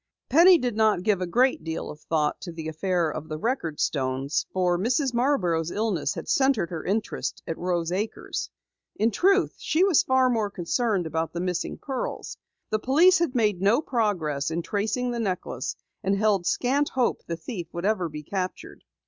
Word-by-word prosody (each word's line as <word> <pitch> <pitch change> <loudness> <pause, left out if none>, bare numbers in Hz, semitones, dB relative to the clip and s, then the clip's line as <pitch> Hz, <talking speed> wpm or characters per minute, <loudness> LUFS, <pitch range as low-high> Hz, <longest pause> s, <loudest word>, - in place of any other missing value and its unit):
Penny 345 +6 +7
did 245 -6 -2
not 215 -4 +2
give 205 -3 +1
a 180 - -1
great 250 +2 +2
deal 160 0 -4
of 150 - -11
thought 150 -2 -1
to 175 - -6
the 165 -1 -6
affair 170 0 0
of 155 +1 -7
the 155 - -3
record 170 - -2
stones 135 0 -1
for 180 -1 +1
Mrs. 245 - 0
Marborough's 180 - +1
illness 185 -9 -1
had - - -6
centered 265 -11 +2
her 165 -2 -4
interest 210 +3 -2
at 165 - -3
Rose 175 -1 -1
Acres. 205 +4 -3 0.5
In 225 +2 +2
truth, 390 - +3
she 320 +4 +1
was 380 -6 +5
far 260 0 +3
more 225 -4 +1
concerned 200 +1 -1
about 160 +1 -2
the 170 - -3
missing 180 -1 -2
pearls. 265 -3 -4 0.4
The 215 - +1
police 330 - +5
had 335 -7 0
made 210 -6 +1
no 205 +6 +4
progress 185 - -1
in 165 +1 -2
tracing 220 +6 -1
the 240 - -3
necklace 185 - -3 0.3
and 195 +1 +1
held 200 -4 +2
scant 280 +4 +1
hope 255 -2 0
the 165 - -3
thief 175 0 -6
would 170 +2 -4 0.3
be 150 0 -7
captured. 185 +3 -5
200 Hz, 180 wpm, -26 LUFS, 165-245 Hz, 0.5 s, Penny